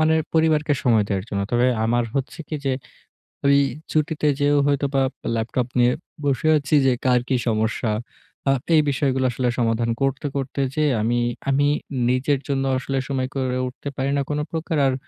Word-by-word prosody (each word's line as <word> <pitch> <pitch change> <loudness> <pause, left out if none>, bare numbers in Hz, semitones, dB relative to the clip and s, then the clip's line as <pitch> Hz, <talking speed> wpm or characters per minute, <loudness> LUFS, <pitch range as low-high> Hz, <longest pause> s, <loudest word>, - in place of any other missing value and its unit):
মানে 155 0 +4 0.2
পরিবারকে 155 -2 +3
সময় 115 -5 +4
দেওয়ার 95 -2 -1
জন্য। 100 -2 -2
তবে 120 +1 +3 0.2
আমার 120 +1 +2
হচ্ছে 135 -1 -3
কি - - -4
যে, 135 - +2 0.7
ঐ - - +5 0.4
ছুটিতে 155 0 0
যেয়েও 145 0 +3
হয়তোবা 140 -1 +1 0.3
ল্যাপটপ 115 +2 -1
নিয়ে 120 0 +4 0.3
বসে 140 +1 +1
আছি 145 +1 0
যে 130 - +4
কার 125 -1 +4
কি 130 - +2
সমস্যা? 110 0 0 0.6
আ - - +6 0.2
এই 155 - +6
বিষয়গুলো 135 -1 +1
আসলে 125 +1 0
সমাধান 115 0 +1
করতে 135 +1 0
করতে 140 0 -2
যেয়ে 155 -2 +2
আমি, 120 +2 +1 0.3
আমি 145 +1 +3 0.4
নিজের 130 +2 +1
জন্য 135 -2 0
আসলে 135 +1 -3
সময় 130 -2 -1
করে 130 -1 -1
উঠতে 130 +3 -7
পারি 135 +1 0
না - - +2
কোন 150 0 -1
প্রকার। 160 -1 -2
আর 130 - +1
135 Hz, 170 wpm, -22 LUFS, 120-145 Hz, 0.7 s, আ